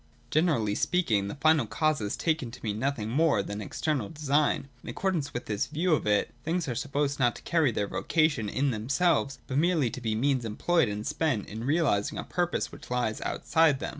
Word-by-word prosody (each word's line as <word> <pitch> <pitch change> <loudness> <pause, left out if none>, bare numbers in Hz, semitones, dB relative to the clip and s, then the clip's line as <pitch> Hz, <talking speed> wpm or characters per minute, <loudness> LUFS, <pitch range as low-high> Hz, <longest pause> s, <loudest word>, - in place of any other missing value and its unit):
Generally 150 - +2
speaking, 110 - +1
the - - -5
final 150 -3 +3
cause 155 +6 +1
is 105 -1 -2
taken 160 -7 0
to 125 - -12
mean 105 -1 -2
nothing 130 -4 -1
more 140 -3 +2
than 100 +1 -5
external 135 +1 -2
design. 145 -2 +1
In - - -9
accordance 170 -7 -1
with 120 - -5
this 105 -1 -1
view 165 +3 +1
of 150 - 0
it, 105 -1 +2
things 165 0 -1
are 125 - -1
supposed 145 +2 -1
not 120 -2 +3
to - - -11
carry 160 -6 +2
their 105 -2 -1
vocation 150 -9 +1
in 135 +5 0
themselves, 140 +5 +1
but 135 +1 -1
merely 160 -7 +2
to 125 - -7
be 110 -2 -1
means 130 +2 +1
employed 120 +6 +1
and 105 +1 -4
spent 150 -8 -1
in 110 +3 -6
realising 140 -9 +1
a - - -3
purpose 175 -1 -1
which - - -12
lies 120 -3 -1
outside 160 -3 +2
of - - -9
them. - - -2
140 Hz, 205 wpm, -28 LUFS, 110-155 Hz, -, final